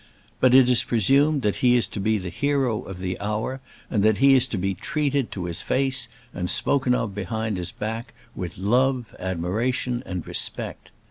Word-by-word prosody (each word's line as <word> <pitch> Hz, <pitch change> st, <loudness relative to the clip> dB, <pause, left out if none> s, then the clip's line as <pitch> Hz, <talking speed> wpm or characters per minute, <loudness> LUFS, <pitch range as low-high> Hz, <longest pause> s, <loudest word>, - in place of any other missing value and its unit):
But 130 Hz, 0 st, +5 dB
it 130 Hz, -2 st, +7 dB
is 125 Hz, -1 st, +5 dB
presumed 135 Hz, +6 st, +3 dB
that 105 Hz, -, 0 dB
he 125 Hz, -1 st, +4 dB
is 120 Hz, -, +3 dB
to -, -, -6 dB
be 110 Hz, +2 st, +1 dB
the 90 Hz, -3 st, -5 dB
hero 135 Hz, -, 0 dB
of 95 Hz, -, -8 dB
the 90 Hz, 0 st, -4 dB
hour, 105 Hz, +6 st, -3 dB, 0.3 s
and 105 Hz, -, 0 dB
that 110 Hz, 0 st, +3 dB
he 135 Hz, +1 st, +6 dB
is 130 Hz, -1 st, +4 dB
to 115 Hz, -, -3 dB
be 95 Hz, +1 st, -1 dB
treated 140 Hz, +3 st, -1 dB
to 90 Hz, -3 st, -4 dB
his 85 Hz, -2 st, -4 dB
face, 130 Hz, -2 st, +1 dB, 0.3 s
and 90 Hz, -2 st, -3 dB
spoken 130 Hz, -3 st, +2 dB
of 110 Hz, -5 st, -2 dB
behind 105 Hz, +2 st, -3 dB
his 90 Hz, 0 st, -3 dB
back, 115 Hz, +3 st, -5 dB, 0.2 s
with 90 Hz, -2 st, -6 dB
love, 125 Hz, +5 st, +1 dB
admiration, 110 Hz, +8 st, -1 dB
and 90 Hz, -, -5 dB
respect. -, -, -3 dB
115 Hz, 190 wpm, -24 LUFS, 95-130 Hz, 0.3 s, it